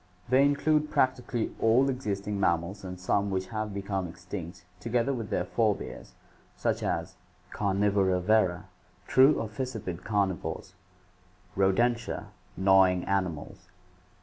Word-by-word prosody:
They 130 +2 +5
include 150 +2 +2
practically 125 -2 0
all 120 +4 +4
existing 105 -6 -2
mammals 95 +2 0
and 90 -1 -7
some 100 +2 0
which 95 -1 -2
have 110 -1 -3
become 100 -2 -3
extinct 85 0 -8
together 120 +5 0
with 115 -5 -5
their 90 - -1
forebears, 110 +1 -2 0.4
such - - -1
as: - - -3 0.3
Carnivora 100 -2 +1
Vera, 90 -2 +2 0.4
true 135 +3 +5
or 115 - -2
fissiped 110 -6 -5
carnivores. 100 -3 -2 0.8
Rodentia, 115 +5 +1 0.3
gnawing 95 -1 +4
animals. 90 -6 -3
100 Hz, 115 wpm, -28 LUFS, 95-115 Hz, 0.8 s, They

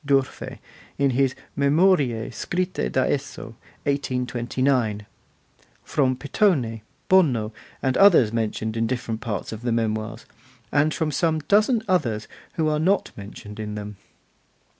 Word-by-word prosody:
d'Urfe, 135 -2 0 0.4
in 140 -1 +2
his 135 +1 +1 0.2
'Memorie 140 -6 +2
scritte 180 +8 -2
da 130 - +2
esso', 135 -5 -3 0.3
1829; 125 -4 0 0.8
from 130 -3 +1
Pittoni, 135 - +1 0.3
Bono, 125 -13 +3 0.3
and 130 -1 +1
others 165 - +6
mentioned 110 -1 -2
in 115 0 0
different 120 -3 -3
parts 105 -4 -4
of 110 0 -6
the 120 0 -1
Memoirs, 110 0 -2 0.5
and 150 +2 +3
from 155 0 -1
some 160 +2 +1
dozen 215 - +3
others 120 - 0 0.3
who 160 -3 0
are 150 0 +1
not 190 +6 +1
mentioned 105 +1 -10
in 105 -1 -4
them. 105 0 -6
130 Hz, 125 wpm, -24 LUFS, 110-150 Hz, 0.8 s, others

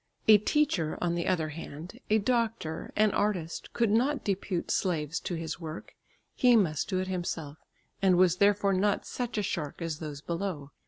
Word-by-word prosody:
A 215 -1 +9
teacher, 210 - +1
on 175 -1 0
the 170 0 -2
other 165 -4 +1
hand, 165 +6 -8
a 215 - +5
doctor, 225 -7 -1
an 215 0 +4
artist, 180 -7 -2
could 230 -3 +1
not 265 +6 +2
depute 195 -3 -2
slaves 165 -4 0
to 175 - -4
his 165 0 -4
work; 160 -1 -7 0.4
he 245 -1 +5
must 165 -9 +1
do 190 - 0
it 185 0 -1
himself, 165 -5 -4 0.4
and 185 -2 +4
was 180 -1 +4
therefore 200 0 +3
not 200 +2 +1
such 245 -3 -4
a 210 - +1
shark 155 -7 -3
as 165 -3 -3
those 150 -3 -6
below. 170 -4 -4
185 Hz, 175 wpm, -29 LUFS, 160-210 Hz, 0.4 s, A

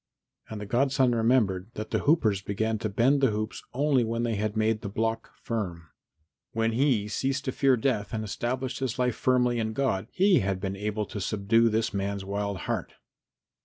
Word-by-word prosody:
And 110 - -6
the 105 - -5
godson 130 +3 +2
remembered 110 -5 +2
that 110 +1 -6
the - - +1
hoopers 110 - +2
began 110 +3 -1
to 110 - -2
bend 130 +7 +3
the 135 - +4
hoops 110 +2 -3
only 135 -1 +2
when 115 +1 -1
they 115 -1 0
had 105 +1 -2
made 110 0 +1
the 100 - -5
block 115 +2 -2
firm. 90 - -4 0.6
When 115 0 +1
he 120 -4 +2
ceased 135 +6 -1
to 130 - 0
fear 135 0 +3
death 110 -4 -1
and 110 -1 -2
established 125 +5 -3
his 130 -3 -2
life 125 -2 +1
firmly 125 -2 +2
in 110 -1 -1
God 110 -6 0
he 195 +1 +4
had 95 -1 -1
been 95 0 -3
able 105 +1 -2
to 105 0 -6
subdue 110 +4 +2
this 110 0 0
man's 100 0 -2
wild 100 -1 -3
heart. - - -3
110 Hz, 190 wpm, -27 LUFS, 105-125 Hz, 0.6 s, the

